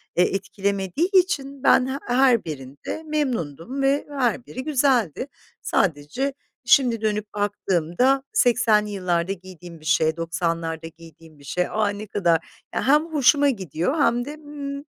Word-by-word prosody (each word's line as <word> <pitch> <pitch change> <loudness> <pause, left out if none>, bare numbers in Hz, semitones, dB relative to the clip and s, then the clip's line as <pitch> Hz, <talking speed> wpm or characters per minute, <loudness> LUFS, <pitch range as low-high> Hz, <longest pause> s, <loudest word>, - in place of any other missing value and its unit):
eee, 180 - +5
etkilemediği 195 - -1
için 285 -8 +1
ben 255 -2 +5
h 265 +1 -3
her 245 -3 +3
birinde 140 - -7
memnundum 260 - -2
ve 275 +1 +2
her 250 -4 -1
biri 255 - -7
güzeldi. 260 - +1 0.3
Sadece 170 - 0 0.3
şimdi 240 -2 +4
dönüp 210 -1 -2
baktığımda, 205 +5 +1
80'li 230 -4 +3
yıllarda 180 -2 -1
giydiğim 180 -3 -12
bir 155 - -17
şey, 160 0 +2
90'larda 165 -1 -2
giydiğim 165 -1 -16
bir - - -17
şey, 180 +6 -1
"A, 215 -1 +1
ne 205 +1 -6
kadar" 175 -5 +2 0.4
Ya, - - -1
hem 300 +3 +5
hoşuma 290 -2 +4
gidiyor 190 - -2
hem 240 -2 +2
de 295 +2 -7
mmm 285 -2 -7
210 Hz, 140 wpm, -23 LUFS, 170-270 Hz, 0.4 s, eee